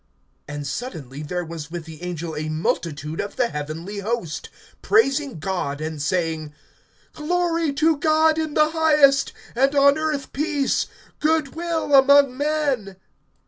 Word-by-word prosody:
(13)And 145 0 -5
suddenly 145 - -6
there 175 +4 -3
was 160 -2 -7
with 170 -1 -6
the 160 0 -11
angel 170 -2 -5
a 155 +1 -3
multitude 155 -1 -2
of 200 - -6
the 245 -2 +1
heavenly 160 +7 -5
host, 200 -6 -3 0.3
praising 290 - +2
God 155 -4 -3
and 155 -1 -4
saying: 160 -2 -2 0.6
(14)Glory 330 -2 0
to 320 0 +3
God 315 +1 +3
in 315 -2 -3
the 305 0 +4
highest, 300 -4 +4 0.2
and 270 +3 +2
on 280 +1 +5
earth 305 -3 -2
peace, 290 -2 0 0.3
good 310 -2 +1
will 330 -3 -2
among 275 -1 +6
men. 285 -8 -1
255 Hz, 140 wpm, -23 LUFS, -, 0.6 s, among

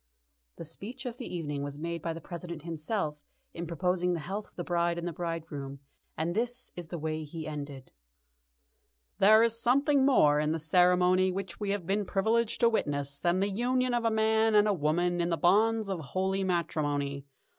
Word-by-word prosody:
The - - -8
speech 235 - -5
of 245 -1 -5
the 250 - -7
evening 145 -5 -3
was 145 0 -5
made 170 +1 -4
by 165 - -2
the 165 - -6
President 170 -2 -7
himself 160 -1 -3 0.3
in 170 0 -5
proposing 180 +2 0
the 170 - -2
health 195 +7 -5
of - - -29
the 175 - -4
bride 170 0 0
and 170 0 -3
bridegroom, 155 -5 -5 0.4
and 165 +2 -1
this 245 +4 -2
is 175 -2 -7
the 170 - -5
way 155 0 -3
he 155 +1 -7
ended: 145 -3 -7 1.3
"There 215 +3 +7
is 230 0 +1
something 280 +3 +3
more 150 - +5
in 150 +1 +1
the - - -1
ceremony 180 +3 +4
which 185 -2 -5
we 205 -2 -2
have 200 -3 -1
been 200 +3 0
privileged 220 +4 +1
to 235 - +6
witness 145 -9 -1
than 175 +2 +1
the 200 - +1
union 250 +4 0
of 240 -1 +1
a 230 - +3
man 220 0 +2
and 210 0 +5
a 210 - +3
woman 175 +2 +1
in 170 - 0
the 165 - 0
bonds 215 +6 +3
of 190 -3 -2
holy 190 +6 -1
matrimony. 145 -6 -1
175 Hz, 190 wpm, -29 LUFS, 160-210 Hz, 1.3 s, There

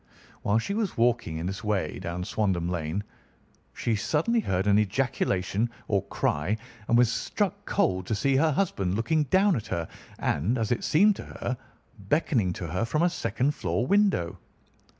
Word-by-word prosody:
While 100 +2 +2
she 115 - -1
was 210 -3 -1
walking 115 -8 +1
in 80 - -4
this 95 +5 -4
way 100 -7 -1
down 85 +1 -4
Swandam 95 -4 0
Lane, 85 +2 -2 0.7
she 115 - -1
suddenly 160 - +1
heard 95 - 0
an 105 0 +5
ejaculation 105 -1 0 0.2
or 100 -2 +2
cry, 90 +9 0 0.3
and 120 - +4
was 120 -1 +5
struck - - -2
cold 95 0 +1
to 110 - 0
see 135 +6 +1
her 160 +3 +3
husband 100 - 0
looking 150 +8 +1
down 190 +4 +4
at 110 - -4
her 85 -3 -2 0.3
and, 100 - 0
as 115 -1 -1
it 120 - 0
seemed 200 +6 +4
to - - -7
her, 125 - -4 0.4
beckoning 110 - +1
to 90 - -5
her 90 +7 -1
from 150 +8 +1
a 175 - +3
second 130 - 0
floor 100 - -1
window. 200 - +2
110 Hz, 170 wpm, -27 LUFS, 95-145 Hz, 0.7 s, an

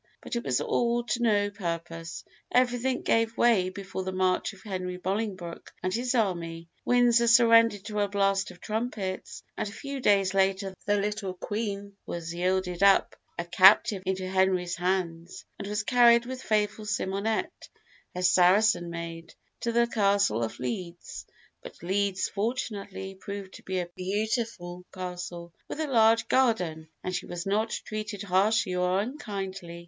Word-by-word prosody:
But - - -6
it 235 - -2
was 125 -2 +1
all 240 0 +1
to 240 0 -2
no 205 -3 +2
purpose. 170 -3 -5 0.3
Everything 250 +1 +1
gave 225 0 +1
way 210 -6 +4
before 195 0 -6
the 190 - -3
march 185 +1 +1
of 195 -2 -16
Henry 185 -3 -4
Bolingbroke 190 -2 -4
and 185 0 -1
his 245 +2 0
army. 170 -6 -1
Windsor 240 -1 +4
surrendered 230 -3 +5
to 210 0 -3
a 205 - +2
blast 195 -1 +1
of 180 -1 -13
trumpets, 215 -4 -4
and 210 - -3
a - - -10
few 275 +5 -6
days 195 -5 +3
later 195 0 +1
the 205 0 +3
little 205 -2 -2
Queen 200 0 -4
was 170 -1 -5
yielded 180 0 -1
up 200 -1 +5 0.2
a 170 - -3
captive 190 +3 +6
into 190 0 -1
Henry's 185 -2 +1
hands, 175 -1 -2
and 200 - -5
was 210 0 -1
carried 235 0 +5
with 260 +1 -6
faithful 215 -1 0
Simonette, 210 +1 -2 0.5
her 180 - -3
Saracen 180 +1 +4
maid, 165 0 -7 0.2
to 235 - -1
the 235 +1 +3
Castle 200 - +2
of 115 - -3
Ledes; 170 +8 -5 0.3
but - - -11
Ledes, 195 +1 0
fortunately, 200 -3 -4
proved 200 0 -8
to - - -11
be 190 0 -3
a 175 -1 -2
beautiful 195 -2 -2
castle, 180 -2 -6
with - - -6
a 315 - 0
large 230 -4 +4
garden, 180 -12 +1 0.2
and 185 - -2
she 180 - -4
was 175 +1 -5
not 215 +3 +1
treated 215 -2 -5
harshly 200 +1 +2
or 180 +1 +1
unkindly. 195 - -5
195 Hz, 155 wpm, -28 LUFS, 180-220 Hz, 0.5 s, captive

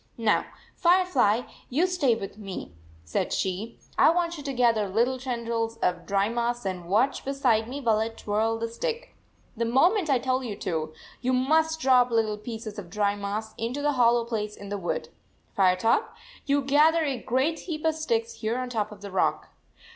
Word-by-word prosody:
" - - -39
Now, 225 -3 +2 0.3
Firefly, 340 - +3 0.3
you 300 +8 +2
stay 340 -10 +2
with 205 -1 -7
me," 195 - -7 0.3
said 80 - -1
she. 190 +4 -2
" - - -34
I - - +7
want 340 0 +1
you 300 - -7
to 280 - -2
gather 230 -5 +2
little 240 +6 +1
tendrils 235 -3 -2
of 175 -1 -1
dry 200 0 +2
moss 235 0 -2
and 180 -2 -4
watch 240 +8 +2
beside 250 -5 +1
me 280 +3 -5
while 225 -4 +2
I 220 +1 0
twirl 225 0 -1
the 230 0 -2
stick. 470 - -4 0.4
The 235 - -1
moment 330 - +3
I 270 - +4
tell 255 +1 0
you 220 -5 -4
to, 160 -5 -3 0.3
you 255 +1 +1
must 315 +5 +2
drop 255 -3 +4
little 220 -2 0
pieces 220 -1 -6
of 180 -4 -9
dry 205 +1 +1
moss 205 +2 -4
into 250 +6 -3
the 295 - +3
hollow 240 -3 +3
place 215 -3 -3
in 200 - -10
the 205 - -2
wood. 175 - -3 0.5
Firetop, 190 - +2 0.3
you 285 0 +2
gather 305 +4 +4
a 270 -6 -2
great 265 +7 0
heap 310 -1 -4
of 320 - +3
sticks 455 +9 -1
here 225 +2 -1
on 255 -1 -4
top 215 -3 -1
of 205 -2 -12
the 200 -1 -8
rock." 190 - 0
235 Hz, 190 wpm, -26 LUFS, 210-275 Hz, 0.5 s, I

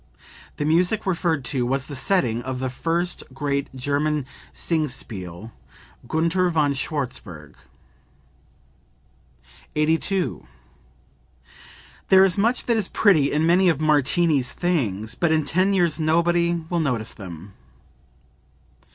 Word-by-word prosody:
The 145 - -3
music 180 +7 +2
referred 165 -7 0
to 130 -1 -1
was 135 +2 0
the 145 - -8
setting 130 - 0
of 130 +1 -4
the 130 -1 -3
first 170 +6 -1
great 140 0 -1
German 145 +2 -1 0.3
Singspiel, 110 - -3 0.6
"Gunther 170 +4 +1
von 150 -4 +1
Schwarzburg.") 125 - -5 2.2
82. 160 +5 0 1.7
"There 190 0 +7
is 185 -2 +1
much 230 +5 +1
that 235 -2 +2
is 210 -4 0
pretty 160 -10 +3
in 155 +2 +1
many 180 +2 +4
of 160 -4 +1
Martini's 150 -3 +2
things, 110 - -1
but 170 -2 0
in 155 -2 +2
ten 185 +6 +2
years 175 -5 +1
nobody 170 +1 +1
will 175 - +1
notice 125 -8 -1
them." 95 0 -10
155 Hz, 115 wpm, -23 LUFS, 130-175 Hz, 2.2 s, There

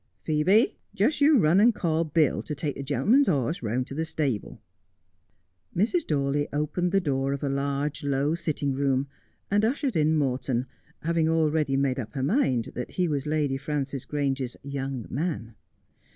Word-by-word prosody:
' - - -45
Phcebe, 170 +9 +3 0.2
just 230 +10 +1
you 290 0 +6
run 175 -2 +4
and 230 +1 +5
call 165 -3 +1
Bill 155 -2 +2
to 150 - -5
take 145 0 -2
the - - -5
gentleman's 215 - +3
horse 150 -1 0
round 120 +3 -1
to 135 - -9
the 160 +3 -1
stable.' 145 -8 -2 1.2
Mrs. 235 - +1
Dawley 145 0 0
opened 150 +5 -1
the 195 - +4
door 135 -5 0
of 140 - -5
a 140 - 0
large, 140 +2 -2
low 140 +2 +1
sitting 150 -4 -1
room, 135 0 +1 0.4
and 205 +1 +3
ushered 265 +3 0
in 155 0 +3
Morton, 130 -3 0 0.4
having 165 0 +1
already 155 -3 +2
made 135 -1 +1
up 110 -3 -6
her 130 - -2
mind 135 - +1
that 125 - -5
he 180 -1 +1
was 145 -2 -2
Lady 150 -3 0
Frances 140 -1 -3
Grange's 135 -3 -2
' - - -42 0.2
young 135 -4 -4
man.' 140 -6 -3
145 Hz, 175 wpm, -26 LUFS, 135-165 Hz, 1.2 s, you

